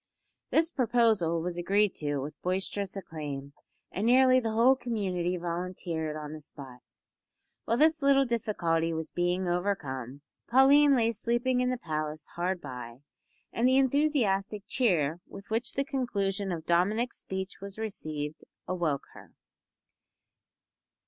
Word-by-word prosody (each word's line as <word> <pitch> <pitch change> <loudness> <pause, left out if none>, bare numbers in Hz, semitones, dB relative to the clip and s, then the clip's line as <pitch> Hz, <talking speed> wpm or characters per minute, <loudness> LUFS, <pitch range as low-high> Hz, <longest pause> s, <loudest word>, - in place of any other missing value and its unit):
This 325 +1 +2
proposal 220 -10 +2
was 175 0 -3
agreed 200 +3 +2
to 145 -1 -1
with 140 +3 -6
boisterous 190 +2 -2
acclaim, 145 -6 -6 0.4
and 205 +4 -1
nearly 255 +1 +6
the 230 -3 -2
whole 240 +4 +5
community 190 -8 -2
volunteered 170 -2 -3
on 150 0 -6
the 155 - -8
spot. 135 -4 -11 0.9
While 230 - +1
this 315 +2 +4
little 275 -1 +4
difficulty 175 -9 0
was 160 0 -4
being 180 +1 0
overcome, 145 - -2 0.3
Pauline 275 +3 +6
lay 230 -2 +2
sleeping 240 +3 0
in 250 - +1
the 255 - -1
palace 155 -5 -4
hard 180 +1 -1
by, 125 -2 -8 0.5
and 235 +2 +2
the 260 +1 +4
enthusiastic 245 -8 +1
cheer 175 - +1
with 195 +2 -12
which 230 +2 -1
the 275 - -1
conclusion 200 -9 -1
of 165 -2 -4
Dominick's 205 +8 +1
speech 190 0 -5
was 200 0 -8
received 155 -9 -4 0.2
awoke 170 -6 -1
her. - - -15
190 Hz, 135 wpm, -29 LUFS, 160-240 Hz, 0.9 s, nearly